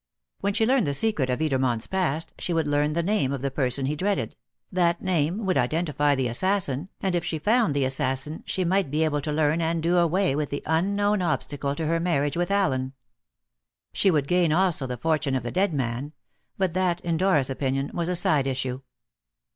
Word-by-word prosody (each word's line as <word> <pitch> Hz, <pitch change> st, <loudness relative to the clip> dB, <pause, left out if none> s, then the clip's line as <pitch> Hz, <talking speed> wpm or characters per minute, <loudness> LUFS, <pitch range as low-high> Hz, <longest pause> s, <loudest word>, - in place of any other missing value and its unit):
When 200 Hz, 0 st, -1 dB
she 220 Hz, -, +3 dB
learned 255 Hz, -, +2 dB
the 140 Hz, -, 0 dB
secret 155 Hz, -8 st, 0 dB
of 125 Hz, +4 st, -1 dB
Edermont's 130 Hz, -6 st, 0 dB
past, 165 Hz, -5 st, -2 dB
she 175 Hz, -, -2 dB
would 160 Hz, -2 st, +1 dB
learn 145 Hz, +1 st, +1 dB
the 170 Hz, +1 st, 0 dB
name 190 Hz, -8 st, +1 dB
of 140 Hz, -2 st, -4 dB
the 140 Hz, -, -1 dB
person 135 Hz, -1 st, -1 dB
he 145 Hz, +3 st, -1 dB
dreaded; 190 Hz, -, -1 dB, 0.4 s
that 175 Hz, -2 st, +2 dB
name 185 Hz, +3 st, 0 dB
would 185 Hz, -7 st, +2 dB
identify 145 Hz, +1 st, +1 dB
the 130 Hz, -2 st, 0 dB
assassin, 175 Hz, -, -1 dB
and 190 Hz, -2 st, 0 dB
if 175 Hz, -1 st, 0 dB
she 160 Hz, -, -2 dB
found 210 Hz, -, +2 dB
the 140 Hz, -2 st, +2 dB
assassin 135 Hz, +3 st, -1 dB
she 185 Hz, -, -1 dB
might 190 Hz, -2 st, +1 dB
be 155 Hz, +3 st, +1 dB
able 150 Hz, -2 st, 0 dB
to 150 Hz, -, -3 dB
learn 155 Hz, +2 st, +1 dB
and 165 Hz, 0 st, -1 dB
do 175 Hz, +2 st, +2 dB
away 175 Hz, -2 st, +2 dB
with 150 Hz, -1 st, -1 dB
the 145 Hz, -, -4 dB
unknown 200 Hz, +5 st, +1 dB
obstacle 145 Hz, -4 st, -1 dB
to 160 Hz, -, -3 dB
her 165 Hz, +2 st, +1 dB
marriage 145 Hz, -5 st, 0 dB
with 175 Hz, +1 st, -1 dB
Allen. 135 Hz, -10 st, 0 dB, 1.0 s
She 195 Hz, -, +3 dB
would 150 Hz, -6 st, +1 dB
gain 175 Hz, -1 st, +2 dB
also 170 Hz, -5 st, +1 dB
the 125 Hz, -1 st, -4 dB
fortune 155 Hz, 0 st, 0 dB
of 130 Hz, -, -1 dB
the 120 Hz, -, -4 dB
dead 195 Hz, +1 st, +1 dB
man; 135 Hz, +1 st, -3 dB, 0.4 s
but 190 Hz, -3 st, 0 dB
that, 180 Hz, -1 st, +1 dB
in 170 Hz, -1 st, -1 dB
Dora's 155 Hz, -7 st, +2 dB
opinion, 135 Hz, +1 st, -2 dB
was 170 Hz, 0 st, -2 dB
a 180 Hz, -, +1 dB
side 150 Hz, -5 st, +2 dB
issue. 130 Hz, -1 st, -2 dB
155 Hz, 205 wpm, -25 LUFS, 140-180 Hz, 1.0 s, she